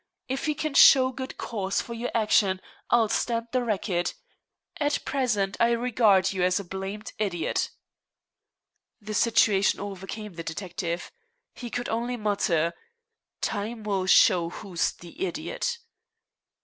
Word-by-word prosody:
If 270 +4 -2
you 300 - +1
can 310 -1 -3
show 260 -2 +7
good 260 +1 -7
cause 195 -3 -2
for 235 - -5
your 235 +1 -3
action, 210 -4 +3 0.3
I'll 235 -1 +4
stand 230 +2 -1
the 255 -1 +1
racket. 195 -5 -1 0.6
At 290 -1 0
present 215 -8 0
I 235 0 +4
regard 220 -6 +3
you 190 - -2
as 180 +2 +2
a - - -5
blamed 195 +3 -6
idiot." 190 -6 -1 1.3
The 215 -1 -7
situation 210 -3 +3
overcame 200 +1 -6
the 165 0 -7
detective. 175 0 -4 0.4
He 240 - -7
could 245 +1 -3
only 240 +2 -2
mutter: 180 -6 +1 0.7
"Time 220 +2 -3
will 195 -3 -1
show 175 -2 +5
who's 175 -1 -2
the 175 - -8
idiot." - - -3
210 Hz, 135 wpm, -26 LUFS, 190-240 Hz, 1.3 s, show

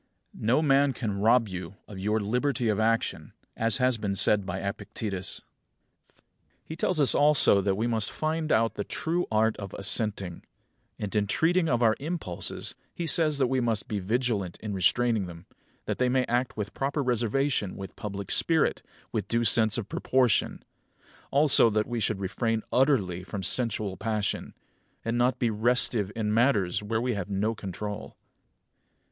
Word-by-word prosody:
36. - - -14
No 125 +6 +3
man 140 -1 +3
can 105 -6 -3
rob 115 +2 +4
you 95 0 -7
of 100 -3 -9
your 105 +3 0
liberty 120 +3 0
of 105 -1 0
action; 115 +1 -1 0.2
as 115 +3 +2
has 125 -3 +1
been 100 -2 -2
said 100 0 +3
by 95 -1 -3
Epictetus. 100 -1 -5 0.6
37. - - -31 0.4
He 160 - -7
tells 170 0 0
us 140 - +6
also 145 -9 +4
that 95 0 0
we 110 - 0
must 115 -3 0
find 155 0 -2
out 115 +1 +2
the 105 - -4
true 170 +9 -2
art 110 0 +2
of 100 -2 -7
assenting; 100 -3 0 0.5
and 105 -1 -5
in 105 -1 +1
treating 165 - +2
of 120 -2 +1
our 110 -1 +4
impulses 150 - -3 0.2
he 170 - -5
says 155 -2 +3
that 135 - +2
we 130 +1 0
must 115 -4 -1
be 105 -3 -2
vigilant 105 -3 -1
in 105 -2 -5
restraining 110 +2 +1
them, 85 0 -11 0.4
that - - -3
they 125 0 +2
may 130 0 +1
act 120 +1 -1
with 105 -1 -4
proper 140 +2 -2
reservation, 120 -3 0
with 95 0 -8
public 100 -2 -5
spirit, 160 -3 +3 0.3
with 105 -3 -3
due 115 +2 0
sense 110 0 +4
of 115 - -4
proportion; 125 -5 +1 0.7
also 140 -4 +5
that 110 0 0
we 120 -1 -3
should 105 -2 -1
refrain 110 +3 -2
utterly 105 -10 +2
from 95 +1 -6
sensual 105 -1 +1
passion; 110 -1 -3 0.5
and 115 +1 -1
not 120 +1 +2
be 120 -2 0
restive 110 -2 +1
in 105 -2 -1
matters 110 -7 +2
where 110 +2 -2
we 125 +1 -1
have 100 -3 -4
no 105 +3 0
control. 105 +1 -7
110 Hz, 170 wpm, -27 LUFS, 100-125 Hz, 0.7 s, us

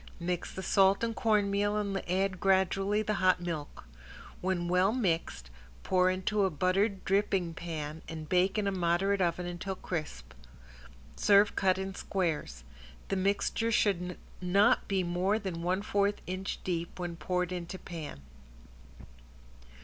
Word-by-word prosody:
Mix 175 0 -3
the 190 - -6
salt 195 +2 +4
and 230 -1 -1
cornmeal 205 -2 +2
and 200 -2 -1
add 190 0 0
gradually 195 +2 +2
the 215 0 -1
hot 185 -1 +4
milk. 165 -4 -5 0.6
When 180 -2 -1
well 180 +3 +3
mixed, 165 - -1 0.3
pour 185 0 +3
into 190 +3 0
a 190 - +3
buttered 190 +5 0
dripping 195 -3 +1
pan 160 -2 -5
and 160 -1 -6
bake 185 +4 +2
in 210 - +1
a 200 - +1
moderate 190 +2 +1
oven 175 0 0
until 175 +2 -4
crisp. 155 - -5 0.8
Serve 205 0 +4
cut 185 -1 +2
in 190 0 -4
squares. 165 - -2 0.5
The 195 - 0
mixture 200 +4 0
should 180 -5 +1 0.2
not 190 +3 +3
be 190 -2 +1
more 180 +4 +1
than 190 -6 -4
one 185 +3 0
fourth 205 0 +1
inch 185 +1 -4
deep 170 -2 -3
when 175 -1 -4
poured 180 +1 -1
into 180 +1 -5
pan. 160 - -8
185 Hz, 140 wpm, -30 LUFS, 175-200 Hz, 0.8 s, salt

